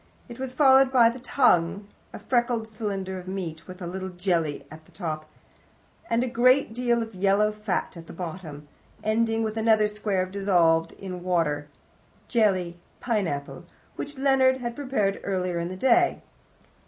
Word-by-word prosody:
It 240 -1 -10
was 265 -1 -3
followed 265 -2 +6
by 235 -3 +5
the 250 - -9
tongue 200 -7 +2 0.2
a - - -8
freckled 235 0 0
cylinder 195 -4 -4
of 180 - -12
meat, 170 -4 -5
with 185 0 -9
a - - -4
little 190 +2 -5
jelly 175 -5 -1
at 160 0 -12
the - - -22
top, 155 -4 -5 0.8
and 230 +1 +2
a - - -1
great 250 +1 +3
deal 240 -1 +1
of 225 0 -10
yellow 200 +3 +2
fat 210 -4 -3
at 165 -1 -11
the - - -9
bottom 165 -4 -7 0.4
ending 225 +1 +1
with 220 0 -3
another 220 -1 +4
square 210 -3 -1
dissolved 175 -4 +2
in 185 -2 -7
water 165 -5 0 0.6
(jelly: 185 -7 +1 0.2
pineapple), 185 - -2 0.3
which 290 0 -6
Leonard 265 -1 +3
had 240 -2 -5
prepared 255 -9 -1
earlier 180 -3 -1
in 170 - -2
the 185 +1 -6
day. 350 - +3
200 Hz, 160 wpm, -26 LUFS, 175-235 Hz, 0.8 s, followed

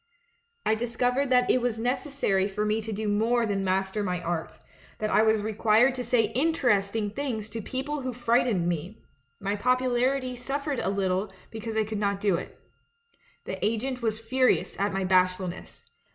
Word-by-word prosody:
I - - +3
discovered 245 +4 0
that 250 -1 +4
it 255 - +2
was 235 -2 -1
necessary 250 -5 0
for 210 +1 -2
me 215 +1 +1
to 220 +1 -6
do 215 +1 -3
more 230 +3 +2
than 200 -2 -1
master 190 +2 0
my 180 -3 -1
art 170 -1 -4 0.2
— - - -25
that 215 0 -2
I - - +5
was 220 -1 +3
required 220 +3 +3
to 250 -1 -4
say 225 -2 +2
inter 295 0 +2
esting 205 +1 0
things 230 -7 -3
to 225 - -4
people 275 +6 -3
who 255 -1 -3
frightened 235 -6 +1
me; 175 +5 -4 0.4
my 200 +1 -1
popularity 255 +2 +1
suffered 275 +2 -3
a - - -1
little 195 0 0 0.2
because 220 0 -5
I 220 - +3
could 215 -1 -4
not 200 -1 0
do 200 -1 +2
it. 170 - -4 0.9
The - - -5
agent 245 +4 -1
was 220 -2 -1
furious 255 +3 +1
at 200 +1 +1
my 195 0 -1
bashfulness. 185 -1 0
220 Hz, 180 wpm, -27 LUFS, 200-250 Hz, 0.9 s, I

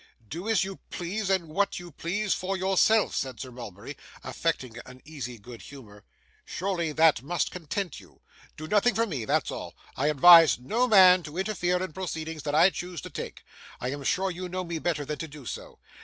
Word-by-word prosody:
'Do 175 - -6
as 220 -4 +3
you 195 0 -6
please, 190 +4 -3
and 190 -4 +1
what 200 +6 0
you 175 -1 -9
please, 190 +7 -1
for 190 +1 -2
yourself,' 195 +3 +3
said 130 -2 -3
Sir 130 - -7
Mulberry, 120 +2 -9 0.3
affecting 130 -8 -3
an 130 0 -12
easy 125 -6 -7
good 115 +2 -12
humour. 105 -8 -13 0.4
'Surely 175 -4 -2
that 160 -5 +4
must 165 +5 -1
content 180 +2 -4
you! - - -20 0.3
Do 155 - -7
nothing 210 +6 +3
for 230 - +2
me; 140 - -4
that's - - 0
all. - - -7 0.2
I 140 - 0
advise 160 -2 +8
no 220 - 0
man 185 -5 +7
to 155 0 -9
interfere 185 -2 0
in 185 - -6
proceedings 160 -3 -5
that 145 0 -2
I 175 +5 +6
choose 175 -1 -6
to - - -9
take. - - -7 0.4
I 125 - -3
am 140 0 -6
sure 190 +7 0
you 180 +1 -6
know 185 +1 -3
me 170 -2 -4
better 155 -3 -1
than 150 +1 -5
to 160 - -4
do 145 -3 -12
so. - - -7
170 Hz, 200 wpm, -27 LUFS, 145-190 Hz, 0.4 s, advise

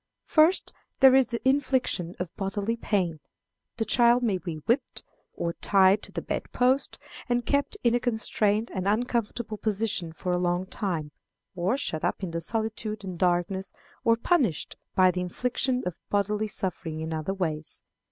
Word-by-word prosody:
First, 320 +4 +3 0.3
there 265 -1 +8
is 265 -1 +5
the 235 +1 -3
infliction 260 -10 +1
of 180 -1 -5
bodily 200 +3 -2
pain. 185 -8 -1 0.6
The 225 - 0
child 240 +2 +4
may 200 -6 +1
be 170 -3 -5
whipped, 225 - -1 0.3
or 170 0 -2
tied 195 +2 +4
to - - -9
the - - -4
bed - - -4
post, 255 +2 +2 0.3
and 240 -1 +1
kept 285 - 0
in 235 - +4
a 245 - +3
constrained 220 -2 0
and 190 -1 -2
uncomfortable 225 0 -1
position 210 -5 -1
for 180 +3 -4
a 180 - +1
long 175 +1 0
time, 170 -6 -3 0.4
or 185 +8 +1
shut 160 - -2
up 175 +3 -1
in 180 - -3
solitude 220 +1 -3
and 185 -3 -6
darkness, 180 +2 0 0.3
or 230 -1 +4
punished 235 - +1 0.2
by 185 -1 +6
the 180 0 -3
infliction 250 +7 -1
of 180 -2 -4
bodily 210 +1 +1
suffering 180 -5 -3
in 160 0 -3
other 160 +5 -2
ways. 155 -5 -3
205 Hz, 160 wpm, -27 LUFS, 180-235 Hz, 0.6 s, there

